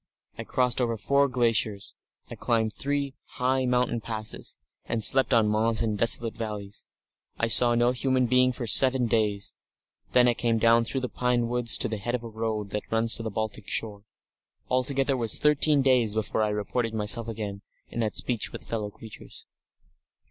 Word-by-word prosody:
I - - -6
crossed 125 -1 +1
over 115 -2 -1
four 140 +5 +2
glaciers; 115 -5 0 0.3
I - - -9
climbed 110 -2 -1
three 140 -1 -3 0.2
high 130 +1 0
mountain 125 -2 0
passes, 110 -1 -5 0.3
and 115 -1 -2
slept 135 +4 +3
on 115 -4 +4
moss 110 +2 +1
in 110 -2 -1
desolate 115 +1 +3
valleys. 105 -3 -7 0.5
I 115 - 0
saw 120 +1 +6
no 120 +1 +2
human 130 0 0
being 130 +1 +3
for 120 -1 -5
seven 130 +2 +4
days. 105 -3 -1 0.6
Then 125 -1 +5
I 120 - +3
came 115 -1 -1
down 115 +1 +3
through 135 +3 -3
pine 125 -1 0
woods 120 -1 +2
to - - +3
the 110 - -4
head 120 +5 -3
of 120 - -5
a 115 - -7
road 110 -2 -4
that 105 - -2
runs 115 0 +2
to - - 0
the 115 - -4
Baltic 110 0 -5
shore. 105 -2 -3 0.7
Altogether 135 +2 0
it - - -2
was 115 -3 +1
thirteen 150 -1 +2
days 125 -5 +2
before 110 0 -1
I 105 - +1
reported 110 +2 -3
myself 110 +2 -1
again, 105 -3 -6 0.3
and 120 - -3
had 110 -2 -2
speech 120 -4 -1
with - - -8
fellow 105 -3 -3
creatures." 110 +1 -12
115 Hz, 180 wpm, -26 LUFS, 110-125 Hz, 0.7 s, saw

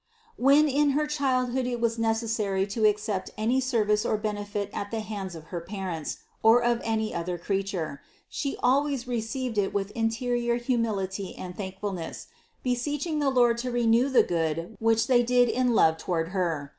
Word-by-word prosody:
384. - - -8
When 285 +3 +6 0.2
in 290 - +3
her 300 - +2
childhood 260 -4 0
it 245 -1 -2
was 230 0 0
necessary 225 -4 0
to 215 +2 -1
ac 210 0 +3
cept 210 -3 -3
any 230 +5 +2
service 220 -5 +1
or 220 - 0
benefit 205 -1 -3
at 200 - -4
the 225 0 -3
hands 200 -4 -5
of 160 - -9
her 170 - -2
parents 185 -4 -4 0.2
or 230 +2 +6
of 240 0 +1
any 220 -1 -1
other 175 +1 -3
creature, 190 -5 -3 0.3
She 280 -2 -3
always 270 0 +2
received 235 0 -2
it 195 0 -1
with 200 0 -1
interior 235 +1 0
humility 215 -6 -2
and 180 -1 -7
thankfulness, 190 -3 -5 0.3
beseeching 290 +5 -1
the 285 -2 +2
Lord 240 -3 +3
to 250 +1 -2
reward 240 +2 +2
the - - +7
good 165 +3 -2
which 225 0 +3
they 250 -2 +4
did 245 +1 +3
in 250 -1 +1
love 160 -4 +4
toward 165 -1 -1
Her. 170 -7 -1
225 Hz, 175 wpm, -27 LUFS, 195-245 Hz, 0.3 s, the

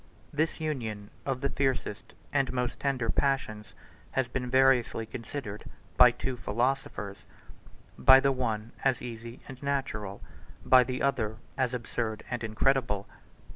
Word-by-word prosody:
This 155 +3 0
union 115 -10 -3 0.2
of 130 -2 -1
the 140 - +1
fiercest 130 -6 -2 0.2
and 135 -1 +2
most 125 -1 -2
tender 130 -5 0
passions 120 -7 -1 0.4
has 130 -2 +1
been 125 0 -3
variously 130 -3 +4
considered 115 -2 -6 0.3
by 125 -1 +9
two 130 +2 -3
philosophers; 105 -4 -2 0.7
by 130 0 +9
the 140 0 +3
one, 115 -4 -2
112 - - +3
as - - -15
easy 115 0 -7
and 130 -1 -10
natural; 130 -8 -2 0.5
by 130 -1 +7
the 125 0 -3
other, 115 -6 +1 0.2
113 - - 0
as 125 -1 -1
absurd 115 -2 -3
and 120 -1 -2
incredible. 110 -2 +1
125 Hz, 140 wpm, -29 LUFS, 110-135 Hz, 0.7 s, by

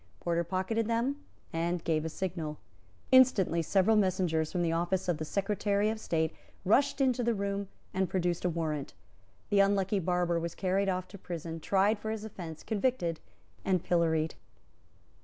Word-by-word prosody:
Porter 170 0 0
pocketed 190 +6 -1
them, 235 +5 0 0.4
and 170 +1 -1
gave 155 -2 +1
a - - -1
signal. 160 -3 -4 0.5
Instantly 235 -10 +5
several 195 +6 +3
messengers 180 -6 +1
from 175 -2 0
the 165 - +1
office 175 +3 0
of 170 -3 0
the 155 - -3
Secretary 205 +3 0
of 220 - -5
State 160 -5 0 0.3
rushed 275 +8 +3
into 255 -2 +2
the 235 -1 +1
room, 200 0 -2 0.3
and 190 0 0
produced 175 -2 0
a 180 - +2
warrant. 155 - -3 0.6
The 205 - +4
unlucky 195 0 +3
barber 175 -1 +1
was 170 0 -4
carried 195 +1 +1
off 185 -1 -1
to 200 - -11
prison, 165 -2 -5
tried 200 +5 +2
for 220 - -4
his 220 -1 -3
offence, 170 -7 -8
convicted 205 -7 0 0.4
and 185 -3 +1
pilloried. 160 -2 +1
185 Hz, 160 wpm, -31 LUFS, 170-205 Hz, 0.6 s, Instantly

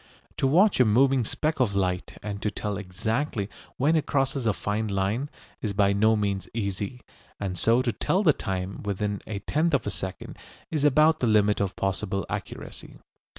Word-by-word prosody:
To 135 - +2
watch 185 +7 +4
a - - +8
moving 130 +4 +4
speck 155 +7 -1
of 110 -6 +1
light 90 -2 -1
and 100 -1 -5
to 105 - 0
tell 105 0 -3
exactly 105 +4 -2 0.3
when 150 +5 +3
it 155 - 0
crosses 135 -3 0
a - - +5
fine 105 +3 -2
line 100 +8 -1 0.3
is 105 -3 -2
by 100 0 +3
no 110 +2 +4
means 100 -2 -1
easy, 100 +2 -3 0.4
and 95 -3 -3
so 115 +7 +3
to 120 - +1
tell 185 - 0
the 155 -6 +5
time 95 -3 -4
within 100 0 -2
a 110 - -3
tenth 155 +10 +1
of 130 - -1
a 105 - -1
second, 95 +1 -6 0.3
is 155 -3 0
about 155 +2 +5
the 125 - +1
limit 105 -2 +3
of 95 -2 -1
possible 95 0 -1
accuracy. - - -7
105 Hz, 185 wpm, -26 LUFS, 100-135 Hz, 0.4 s, a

